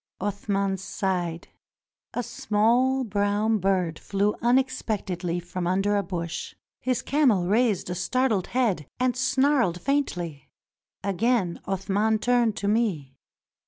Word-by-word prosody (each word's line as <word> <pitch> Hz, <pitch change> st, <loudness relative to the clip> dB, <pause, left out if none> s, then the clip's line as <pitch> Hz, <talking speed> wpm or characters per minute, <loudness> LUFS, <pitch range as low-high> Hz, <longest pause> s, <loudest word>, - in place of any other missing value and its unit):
Athman 200 Hz, -1 st, -1 dB
sighed. 180 Hz, -4 st, -2 dB, 0.7 s
A 245 Hz, -, -1 dB
small 240 Hz, +6 st, +2 dB
brown 205 Hz, 0 st, +1 dB
bird 180 Hz, -4 st, 0 dB
flew 200 Hz, +1 st, 0 dB
unexpect 240 Hz, -6 st, +1 dB
edly 175 Hz, 0 st, -2 dB
from 175 Hz, 0 st, -4 dB
under 195 Hz, +3 st, +1 dB
a 200 Hz, -, +2 dB
bush. 170 Hz, -3 st, -5 dB, 0.2 s
His 255 Hz, -1 st, -1 dB
camel 250 Hz, -11 st, +3 dB
raised 215 Hz, +1 st, +2 dB
a 180 Hz, -, -2 dB
startled 215 Hz, +2 st, 0 dB
head 210 Hz, -, 0 dB
and 255 Hz, -1 st, +1 dB
snarled 260 Hz, -, +2 dB
faintly. 175 Hz, -, -2 dB, 0.5 s
Again 200 Hz, -1 st, +1 dB
Athman 200 Hz, +3 st, +1 dB
turned 240 Hz, -2 st, +2 dB
to 200 Hz, -, -2 dB
me. 200 Hz, -, 0 dB
205 Hz, 120 wpm, -26 LUFS, 185-240 Hz, 0.7 s, camel